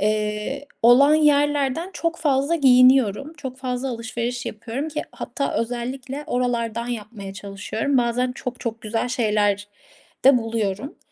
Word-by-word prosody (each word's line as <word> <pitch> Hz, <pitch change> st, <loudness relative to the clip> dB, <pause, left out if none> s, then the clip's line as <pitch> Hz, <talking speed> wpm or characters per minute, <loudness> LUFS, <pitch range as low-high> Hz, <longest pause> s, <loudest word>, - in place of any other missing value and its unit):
eee, 215 Hz, +6 st, -1 dB, 0.2 s
olan 265 Hz, +6 st, +7 dB
yerlerden 290 Hz, +1 st, +2 dB
çok 335 Hz, 0 st, -2 dB
fazla 285 Hz, 0 st, +1 dB
giyiniyorum. 260 Hz, -1 st, +5 dB
Çok 265 Hz, -4 st, -7 dB
fazla 255 Hz, 0 st, -3 dB
alışveriş 235 Hz, +1 st, -4 dB
yapıyorum 230 Hz, +7 st, -4 dB
ki 300 Hz, -1 st, -3 dB
hatta 280 Hz, -, -3 dB
özellikle 255 Hz, +4 st, -3 dB
oralardan 235 Hz, -2 st, -1 dB
yapmaya 210 Hz, -4 st, -6 dB
çalışıyorum. 205 Hz, +7 st, -2 dB
Bazen 245 Hz, +1 st, +1 dB
çok 250 Hz, -1 st, -6 dB
çok 225 Hz, -1 st, -4 dB
güzel 225 Hz, +3 st, -2 dB
şeyler 210 Hz, -4 st, +1 dB, 0.6 s
de 270 Hz, -1 st, +7 dB
buluyorum. 225 Hz, +2 st, -3 dB
245 Hz, 125 wpm, -23 LUFS, 225-275 Hz, 0.6 s, olan